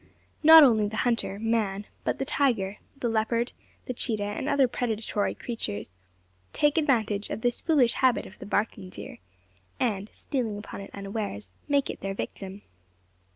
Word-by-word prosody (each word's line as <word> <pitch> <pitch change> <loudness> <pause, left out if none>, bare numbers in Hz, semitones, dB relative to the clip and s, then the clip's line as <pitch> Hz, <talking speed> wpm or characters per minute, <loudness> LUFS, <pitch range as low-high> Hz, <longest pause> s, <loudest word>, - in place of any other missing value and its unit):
Not 320 0 +10
only 220 -6 +5
the 220 +1 -5
hunter, 230 -4 0
man, 210 -2 0 0.2
but - - 0
the 270 - -2
tiger, 225 -9 +1 0.2
the 250 - -1
leopard, 230 +1 0 0.3
the 250 - -3
cheetah, 220 -3 0
and 205 +7 -3
other 280 -2 +4
predatory 220 -4 -1
creatures, 105 - -4 0.6
take 295 -1 +3
advantage 220 -9 +1
of - - -4
this 245 0 0
foolish 270 -8 +3
habit 255 -2 +2
of 200 - -13
the - - -8
barking 205 -2 -1
deer; - - -9 0.6
and 210 -4 -1
stealing 235 -7 -3
upon 205 -1 -8
it 195 - -9
unawares, 195 - -5 0.2
make 280 -1 +2
it - - -10
their 195 0 -3
victim. 195 0 -6
220 Hz, 155 wpm, -27 LUFS, 205-250 Hz, 0.6 s, Not